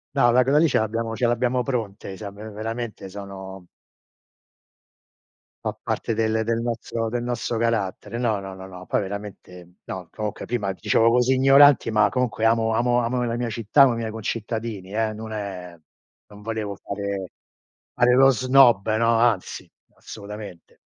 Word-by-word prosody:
No 120 -3 +4
ma 125 +1 +5
quella 140 +3 +2
lì, 165 - +4
ce - - +2
l'abbiamo 115 +1 -2
ce 120 0 +1
l'abbiamo 125 +1 +1
pronte, 105 -6 -4
siam 100 -2 -8 0.2
veramente 115 -1 -5
sono 95 -2 -9 2.0
Fa - - -1
parte 115 - -2
del 110 0 0
del 115 +1 -1
nostro 115 -1 -3
del 120 +1 -3
nostro 120 -1 -2
carattere. 115 0 -2
No, 115 -4 0
no, 95 -1 -8
no, 95 -1 -10
poi - - 0
veramente 95 -3 -9
no. 95 -3 -7
Comunque 105 -1 -5
prima 105 -5 -2
dicevo 110 +3 +2
così 125 +2 +3
ignoranti, 135 +1 +6
ma 105 -2 +4
comunque 125 -3 -1
amo 115 0 +2
amo 120 +1 +2
amo 125 +1 -1
la 115 -1 -1
mia 120 -1 -2
città, 115 +5 +2
amo 130 -3 +6
i - - -3
miei 115 -1 -3
concittadini, 110 -2 -5
eh, 110 0 0
non 110 +1 -8
è 95 -4 -6 0.5
non 105 0 -14
volevo 110 -2 -4
fare 100 -1 -5 0.6
fare 125 0 +4
lo 135 +2 +6
snob, 125 -4 +4
no, 115 0 +3
anzi, 115 -5 0 0.3
assolutamente. 105 -4 -10
110 Hz, 160 wpm, -23 LUFS, 100-120 Hz, 2.0 s, ignoranti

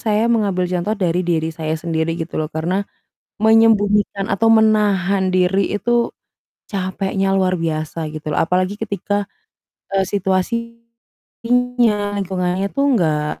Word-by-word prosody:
saya 215 0 +1
mengambil 200 -5 +1
contoh 180 +5 -1
dari 180 -2 0
diri 165 -2 -1
saya 160 0 -3
sendiri, 165 0 -2
gitu 165 -1 -4
loh. 155 - -2
Karena 175 +5 -2 0.5
menyembunyikan 210 -2 +3
atau 225 +4 +2
menahan 205 -4 +3
diri 185 +1 +2
itu 240 +1 +1 0.6
capeknya 195 0 -1
luar 185 -2 +1
biasa, 155 0 -3
gitu 155 0 -5
loh. - - +1
Apalagi 185 +4 0
ketika, 205 -1 -2 0.7
eee, 195 - +3
situasinya 230 +5 -2 1.4
lingkungannya 185 0 -1
itu 275 - -3
enggak 155 - +1
190 Hz, 120 wpm, -19 LUFS, 170-205 Hz, 1.4 s, menyembunyikan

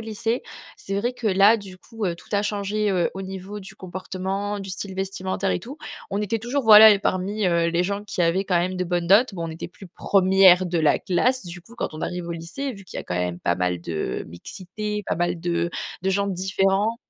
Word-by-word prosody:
lycée, 225 +2 -2 0.3
c'est 195 - -5
vrai 240 +5 -1
que 245 -2 -5
là, 200 +4 +6
du 195 -4 -10
coup, 225 +2 -7
heu, 175 -3 -1
tout - - -17
a 205 0 +2
changé, 210 0 -1
heu, 180 -3 +1
au 195 - -5
niveau 190 +2 -7
du 190 - -12
comportement, 190 +2 -4
du 195 -1 -7
style 190 +1 -6
vestimentaire 190 0 -2
et - - 0
tout. 265 - -10 0.3
On 200 - -1
était 210 +2 -1
toujours 250 +4 -2
voilà 220 0 +10
et 205 - +4
parmi, 195 +2 -1
heu, 170 -1 +2
les 170 +1 +1
gens 200 +2 -2
qui 205 -2 -5
avaient 175 +3 +2
quand 180 -3 +2
même 185 +2 -1
de 180 - -1
bonnes 175 -1 -1
notes, 205 +4 +5
bon, 165 -2 -4
on - - -5
était 160 - -7
plus 190 +2 -13
premières 185 0 +4
de 175 -1 -1
la 155 -2 +3
classe, 250 +7 +1
du 175 +1 -8
coup 225 +7 -17
quand - - -2
on 155 - -7
arrive 180 0 -4
au 170 - -3
lycée, 170 +12 -5
vu 195 -4 -12
qu'il - - -10
y - - -2
a - - -10
quand 90 - -4
même 90 -1 -2
pas 85 - 0
mal 90 -1 -1
de 85 -2 -3
mixité, 200 - -6
pas - - 0
mal 175 +1 -1
de 170 0 -1 0.3
de 190 - +1
gens 200 +1 +1
différents. 195 +3 +1
190 Hz, 240 wpm, -23 LUFS, 175-205 Hz, 0.3 s, voilà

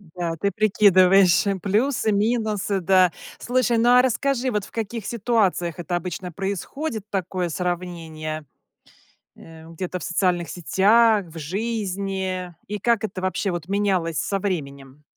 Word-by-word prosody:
Да, 170 -2 -2
ты 200 +5 -1
прикидываешь 195 -2 +5 0.2
плюсы, 225 +3 +1
минусы, 210 -2 0
да. 185 0 +4 0.3
Слушай, 245 -1 +1
ну, 235 +2 +3
а 250 0 +7
расскажи, 260 0 0
вот, 210 -2 -1
в - - -16
каких 225 -1 -4
ситуациях 205 -7 0
это 175 +1 -3
обычно 180 +1 -4
происходит 205 - -4
такое 185 -2 -2
сравнение, 165 -3 -4 0.9
э, 160 0 -14
где-то 180 +2 -5
в 150 - -8
социальных 175 -1 0
сетях, 205 +3 +3
в 165 0 -11
жизни 190 -1 -3
и 210 - -3
как 230 +1 +1
это 185 -3 -4
вобще, 185 +2 -1
вот, 175 -1 -5
менялось 190 -5 0
со 195 - -1
временем? 140 -7 -5
190 Hz, 135 wpm, -23 LUFS, 175-215 Hz, 0.9 s, а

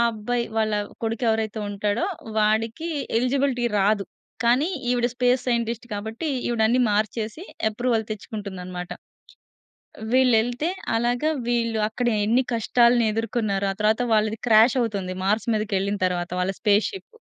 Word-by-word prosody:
అబ్బాయి 235 +3 -2
వాళ్ళ 215 -1 +1 0.3
కొడుకు 225 +2 -2
ఎవరైతే 220 0 -1
ఉంటాడో, 205 - -1 0.3
వాడికి 220 +9 +1 0.3
ఎలిజిబిలిటీ 255 -1 +1
రాదు. 200 0 +2 0.4
కానీ, 250 +8 +3 0.2
ఈవిడ 240 -1 +2
స్పేస్ 250 0 +2
సైంటిస్ట్ 235 0 -1
కాబట్టి 220 +9 -4 0.2
ఈవిడన్ని 235 +1 +2
మార్చేసి 215 - -2 0.3
అప్రూవల్ 230 0 0
తెచ్చుకుంటుందన్నమాట. 190 -4 -6 1.2
వీళ్ళు 255 -2 +5
ఎళ్తే, 245 +7 -2 0.3
అలాగా 245 +6 +1 0.2
వీళ్ళు 230 -2 0
అక్కడ 245 +2 -3 0.2
ఎన్ని 245 +4 +3
కష్టాలను 235 +1 +3
ఎదుర్కొన్నారో. 215 -3 -1
ఆ - - -8
తరువాత 215 +3 +2
వాళ్ళది 215 0 +1
క్రాష్ 225 +3 +6
అవుతుంది. 200 -6 -2
మార్స్ 210 +2 +1
మీదకెళ్ళిన 205 -1 -1
తరువాత 175 -1 -2
వాళ్ళ 185 +2 0
స్పేస్‌షిపు. 220 - 0
225 Hz, 120 wpm, -24 LUFS, 210-245 Hz, 1.2 s, క్రాష్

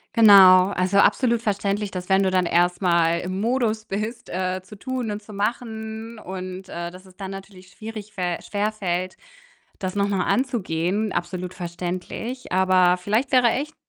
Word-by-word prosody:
Genau, 195 -4 +8
also 185 0 0
absolut 235 +1 +3
verständlich, 200 -1 -1
dass 180 -1 -6
wenn 195 0 +3
du 190 - +1
dann 185 -1 +2
erst 175 +2 +2
mal 170 -2 +3
im 185 +2 -4
Modus 225 -2 0
bist, 215 +3 -5
äh, 185 0 -2
zu 205 +3 -13
tun 255 0 -3
und 205 0 -5
zu 210 0 -13
machen 220 +1 -4
und, 185 -1 -7
äh, 170 0 -5
dass 185 +2 -14
es 185 -1 -19
dann 195 -2 -6
natürlich 195 -1 -10
schwierig 215 +2 -9
fä 180 -3 -2
schwerfällt, 200 -4 -2 0.6
das 185 -1 -4
noch 200 0 0
mal 195 -2 0
anzugehen, 210 - -1
absolut 180 +1 -4
verständlich. 180 +8 -5
Aber 185 -1 +4
vielleicht 210 +8 -1
wäre 250 -3 +5
echt 295 +6 -3
195 Hz, 165 wpm, -23 LUFS, 185-220 Hz, 0.6 s, Genau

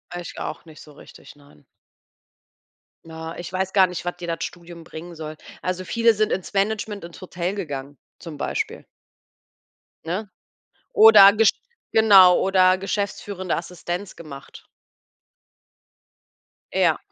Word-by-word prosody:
Ich 175 -1 -8
auch 155 - -6
nicht 155 -2 -14
so 150 - -15
richtig, 145 - -15
nein. 140 - -22 1.4
Na, 160 0 -8
ich 175 - -7
weiß 190 0 -2
gar 190 -2 +5
nicht, 180 0 -7
was 175 - -4
dir 175 - -8
das 165 -1 -3
Studium 170 -1 -9
bringen 170 +2 -10
soll. 155 -1 -7 0.3
Also, 185 0 -3
viele 230 0 +3
sind 215 0 0
ins 190 +2 -4
Management, 210 0 -1
ins 170 +2 -11
Hotel 180 0 -4
gegangen 145 -7 -6 0.2
zum 165 -4 -9
Beispiel. - - -4 1.2
Ne? 190 +6 -4 0.7
Oder 210 -3 +9
gesch 220 -1 +5 0.4
genau 195 -5 +7
oder 185 -1 +3
geschäftsführende 195 -1 -3
Assistenz 175 +2 -6
gemacht. 140 -4 -12 2.1
Ja. - - +2
180 Hz, 125 wpm, -22 LUFS, 165-200 Hz, 2.1 s, Oder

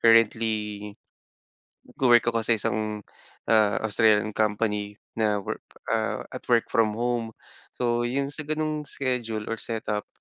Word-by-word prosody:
currently 115 0 +5 1.3
nagwo-work 120 -3 +4
ako 115 -1 -1
sa 115 - +4
isang 105 0 -2 0.5
ah, 105 -3 +4
Australian 110 0 +3
company 105 -1 0 0.2
na 105 -2 +1
work - - -5 0.3
ah, - - 0
at-work-from-home. 115 0 0 0.4
So, 120 -1 0
yung 140 +3 -1
sa 150 0 -6
ganong 155 -1 -2
schedule 120 -6 -2
or 115 - -2
set 115 0 -4
up, 105 0 -1
115 Hz, 120 wpm, -26 LUFS, 105-120 Hz, 1.3 s, currently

